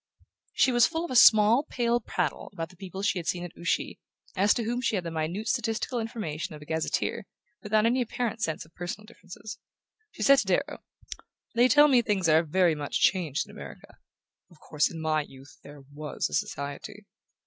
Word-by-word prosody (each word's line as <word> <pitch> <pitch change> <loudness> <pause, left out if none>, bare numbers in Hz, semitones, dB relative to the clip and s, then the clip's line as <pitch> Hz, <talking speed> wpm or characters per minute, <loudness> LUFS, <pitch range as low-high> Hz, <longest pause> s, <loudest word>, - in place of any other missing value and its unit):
She 260 - +3
was 240 -2 +5
full 330 0 -3
of - - -8
a - - -3
small 220 +1 +7
pale 240 -1 +1
prattle 180 -7 -3
about 165 0 -5
the 180 - -17
people 190 +1 -8
she 195 - +1
had 170 - -8
seen 175 -1 -1
at 175 - -9
Ouchy, 170 - -2 0.4
as 200 +2 +3
to 235 - -1
whom 240 +3 -2
she 230 - 0
had 185 - -2
the 170 - -5
minute 165 +7 -3
statistical 225 +2 -1
information 190 -10 -5
of 150 - -12
a - - -14
gazetteer, 160 +1 -2 0.3
without 215 +1 +1
any 245 +3 +2
apparent 235 -1 -3
sense 160 -9 -2
of 160 - -24
personal 180 +4 -6
differences. 215 +1 -11 0.5
She - - -6
said 275 -1 +6
to 205 - -2
Darrow: 280 +10 -1 0.7
"They 240 +2 +4
tell 290 +3 +6
me 255 -4 +4
things 205 -6 0
are 160 0 +5
very 170 +1 +2
much 150 -2 -3
changed 165 -7 +1
in - - -13
America...Of 170 - -15
course 150 -1 0
in 165 - -8
my 155 -1 0
youth 140 0 -14
there 145 0 -13
WAS 150 +1 -4
a - - -11
Society"... 140 0 -4
190 Hz, 195 wpm, -27 LUFS, 160-230 Hz, 0.7 s, small